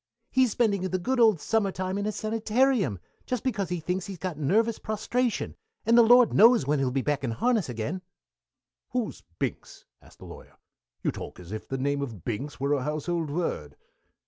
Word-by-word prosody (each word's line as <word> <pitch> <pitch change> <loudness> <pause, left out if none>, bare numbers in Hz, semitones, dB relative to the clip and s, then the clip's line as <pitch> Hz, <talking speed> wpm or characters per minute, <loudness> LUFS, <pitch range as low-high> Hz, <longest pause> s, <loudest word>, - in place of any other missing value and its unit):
"He's 260 -1 +4
spending 210 -3 +1
the 185 0 -1
good 255 +8 -1
old 220 -7 +5
Summer 205 +4 +1
time 185 0 -3
in 205 +1 -1
a - - 0
sanitarium, 220 - +1 0.3
just 250 -2 -2
because 205 -8 -1
he 180 -1 -2
thinks 180 +4 -3
he's 195 -2 -6
got 180 -1 -4
nervous 215 +10 +1
prostration, 225 +3 -1 0.3
and 230 - +4
the 240 - +9
Lord 245 +1 +6
knows 230 - +6
when 145 +1 +1
he'll 135 -1 +1
be 130 +1 -1
back 145 -2 -1
in 130 - -1
harness 215 - +1
again." 125 +11 -3 0.9
"Who's 245 -3 -2 0.2
Binks?" - - -5 0.2
asked - - -19
the - - -12
Lawyer. - - -12 0.5
"You - - +1
talk - - -8
as 90 +1 -11
if 110 - -6
the 135 - -3
name 140 +2 0
of 115 - -6
Binks 130 +6 -4
were 140 +2 +1
a 140 - +1
household 155 +3 -2
word." 140 - -3
185 Hz, 195 wpm, -27 LUFS, 140-225 Hz, 0.9 s, the